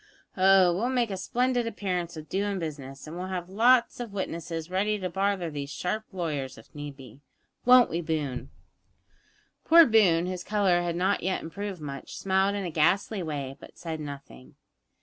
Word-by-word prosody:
Oh, 190 -2 +5
we'll 230 +7 0
make 245 -4 +1
a - - -2
splendid 245 +5 0
appearance 180 -6 -3
of 155 0 -8
doin' 200 +4 -1
business, 140 -5 -6
and 155 +2 -8
we'll 180 +1 -4
have 180 -1 -4
lots 235 +5 +4
of 240 -3 -5
witnesses 165 -3 -4
ready 205 +3 +1
to 185 -3 -4
bother 195 -3 0
these 140 -1 -5
sharp 180 +10 -3
lawyers 150 -8 -3
if 115 - -16
need 145 -2 -7
be 135 +1 -13 0.4
won't 250 0 +8
we, 170 - -1
Boone?" 145 -6 -3 1.1
Poor 335 0 +8
Boone, 190 - +4
whose 180 -1 -4
colour 195 -4 +2
had 170 -1 -2
not 190 +3 +1
yet 185 +2 -1
improved 195 +1 -6
much, 140 -2 -7
smiled 195 +1 +1
in 200 -2 -3
a 175 - -3
ghastly 190 +6 +2
way, 145 -5 -4
but - - -14
said 160 -2 -5
nothing. 140 - -9
180 Hz, 175 wpm, -27 LUFS, 155-200 Hz, 1.1 s, won't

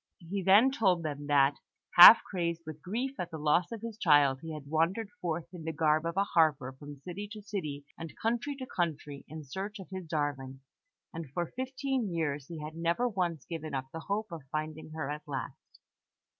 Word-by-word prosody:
He 185 +3 -4
then 205 +8 +6
told 190 -9 +2
them 145 -2 -4
that, 140 -1 +4 0.4
half 180 +6 +11
crazed 170 -3 -3
with 155 -1 -8
grief 250 - -3
at 180 - -3
the 160 - -6
loss 155 +5 +2
of 230 -2 -6
his 225 -2 -7
child, 145 -7 +4
he 160 - -7
had 150 -2 -7
wandered 165 +8 0
forth 170 -1 -2
in 175 -3 -8
the 160 - -2
garb 155 +1 +2
of 170 +2 -4
a 200 - +4
harper 155 -9 +2
from 145 +2 -10
city 185 +6 -6
to 215 - -9
city 155 -9 -5
and 165 -1 -8
country 240 +6 -1
to 265 -1 -6
country, 150 - -3
in 155 0 -8
search 195 +10 -6
of 190 - -10
his 185 -3 -6
darling; 140 -4 -3 0.5
and 165 -4 -6
for 175 +6 -2
fifteen 260 -3 -2
years 150 -5 -2
he 170 - -7
had 155 +1 -7
never 170 +9 +1
once 175 - -2
given 160 -3 -5
up 130 0 -4
the 165 - -5
hope 205 +3 -3
of 165 -2 -6
finding 155 0 -4
her 155 -2 -4
at 150 +1 -4
last. 135 -2 -7
165 Hz, 200 wpm, -31 LUFS, 150-195 Hz, 0.5 s, half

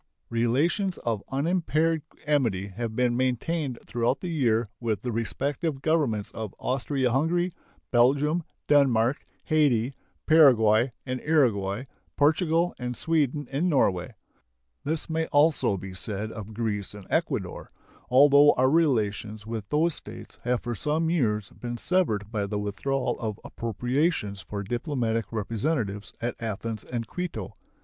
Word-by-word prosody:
Relations 145 - +1
of 115 -4 -2
unimpaired 160 +2 +1 0.2
amity 115 -10 +1
have 110 +3 -5
been 125 -1 +2
maintained 130 +2 -1
throughout 120 +2 0
the 180 - -4
year 120 -7 +2
with 110 -5 -2
the 125 - -2
respective 140 +6 -2
Governments 140 -11 +1
of 110 -3 -6
Austria 130 0 0
Hungary, 170 +7 +1 0.4
Belgium, 140 +7 +3 0.3
Denmark, 135 -2 +3 0.2
Hayti, 140 -6 +2 0.3
Paraguay 125 -7 +6 0.2
and 130 -1 -3
Uruguay, 115 -9 +2 0.3
Portugal, 165 +3 +3
and 125 -1 -4
Sweden 150 -3 0
and 155 +7 +1
Norway. 95 - +1 0.7
This 155 +2 -2
may 160 0 -1
also 145 -8 +3
be 95 +1 -7
said 105 +3 -4
of 110 -1 -8
Greece 105 -3 -2
and 100 -2 -10
Ecuador, - - -1 0.4
although 140 +3 +7
our 130 +1 +3
relations 110 -9 +1
with 110 -3 -5
those 160 +3 +2
States - - -9
have 125 0 0
for 120 - -2
some 155 +7 0
years 105 - 0
been 120 -1 -6
severed 110 - 0
by 105 -3 -1
the 105 +1 -2
withdrawal 105 +7 -2
of 110 -2 -4
appropriations 120 - -1
for 100 0 -5
diplomatic 115 - -2
representatives 110 -1 -2
at 120 +1 -2
Athens 110 0 -4
and 120 -2 -4
Quito. 180 +7 -5
125 Hz, 130 wpm, -27 LUFS, 110-150 Hz, 0.7 s, although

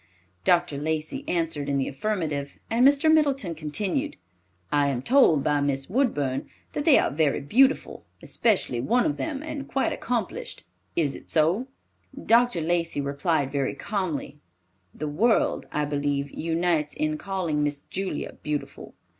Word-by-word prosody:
Dr. 175 - +2
Lacey 155 +1 -2
answered 165 -4 -1
in 140 - +1
the 135 - 0
affirmative, 150 -3 -3
and 235 +2 +3
Mr. 285 +3 +4
Middleton 275 - +2
continued, 195 - -2 0.5
"I 145 -1 +3
am 130 -2 -2
told 225 - +5
by 145 -1 +2
Miss 140 +2 -1
Woodburn 145 - 0 0.2
that 295 - -2
they 310 - +7
are - - +2
very 150 0 +1
beautiful, 260 - +2 0.2
especially 195 - 0
one 240 - +2
of 300 - 0
them, 300 -3 -3
and 300 -3 -5
quite 270 - 0
accomplished. 250 - -3 0.3
Is 150 -5 +1
it - - -12
so?" 170 +10 +2 0.6
Dr. 235 -5 +4
Lacey 165 -1 0
replied 140 0 0
very 140 -2 -1
calmly, 170 -8 -3 0.5
"The 150 - -5
world, 215 +11 +1
I 150 0 0
believe, 145 -1 -1
unites 165 -2 0
in 155 0 -1
calling 185 -6 -1
Miss 145 -1 -1
Julia 190 -5 -4
beautiful." 150 -1 -5
165 Hz, 145 wpm, -26 LUFS, 145-230 Hz, 0.6 s, they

